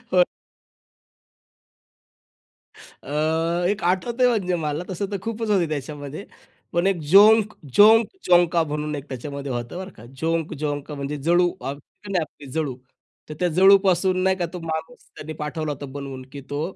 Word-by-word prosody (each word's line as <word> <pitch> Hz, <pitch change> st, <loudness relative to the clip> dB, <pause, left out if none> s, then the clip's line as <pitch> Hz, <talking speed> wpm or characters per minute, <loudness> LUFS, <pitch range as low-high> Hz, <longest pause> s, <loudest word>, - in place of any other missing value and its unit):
हो. 180 Hz, -, +7 dB, 2.8 s
अ, 160 Hz, +4 st, 0 dB
एक 205 Hz, -2 st, -1 dB
आठवतंय 230 Hz, +8 st, +2 dB
म्हणजे 195 Hz, -7 st, +1 dB
मला 155 Hz, 0 st, -2 dB
तसं 190 Hz, +2 st, -2 dB
तर 200 Hz, -, -1 dB
खूपच 225 Hz, +1 st, -4 dB
होते 185 Hz, -5 st, +3 dB
त्याच्यामध्ये 145 Hz, +3 st, -6 dB, 0.5 s
पण 175 Hz, +2 st, +2 dB
एक 190 Hz, -4 st, +1 dB
झोंक, 215 Hz, +1 st, +7 dB, 0.2 s
झोंक, 220 Hz, +2 st, +7 dB, 0.2 s
झोंका 175 Hz, -1 st, +4 dB
म्हणून 150 Hz, 0 st, -3 dB
एक 145 Hz, 0 st, -7 dB
त्याच्यामध्ये 140 Hz, +1 st, -5 dB
होतं 120 Hz, +6 st, -4 dB
बरं 190 Hz, +1 st, -6 dB
का. 110 Hz, -, -14 dB
झोंक, 160 Hz, +5 st, -2 dB
झोंका 145 Hz, 0 st, -4 dB
म्हणजे 140 Hz, +1 st, -4 dB
जळू. 175 Hz, +2 st, +4 dB, 0.2 s
आपली 150 Hz, +3 st, -5 dB
जळू 150 Hz, -3 st, -2 dB, 0.5 s
तर -, -, -5 dB
त्या 180 Hz, -, +2 dB
जळूपासून 185 Hz, +1 st, +4 dB
नाही 190 Hz, 0 st, +3 dB
का 175 Hz, -, -1 dB
तो 180 Hz, -, -5 dB
माणूस 165 Hz, +8 st, -5 dB
त्यांनी 155 Hz, +1 st, -7 dB
पाठवला 150 Hz, 0 st, -3 dB
होता 145 Hz, 0 st, -6 dB
बनवून 140 Hz, -2 st, -6 dB
की 140 Hz, -, -8 dB
तो 145 Hz, +1 st, -2 dB
165 Hz, 145 wpm, -23 LUFS, 145-190 Hz, 2.8 s, हो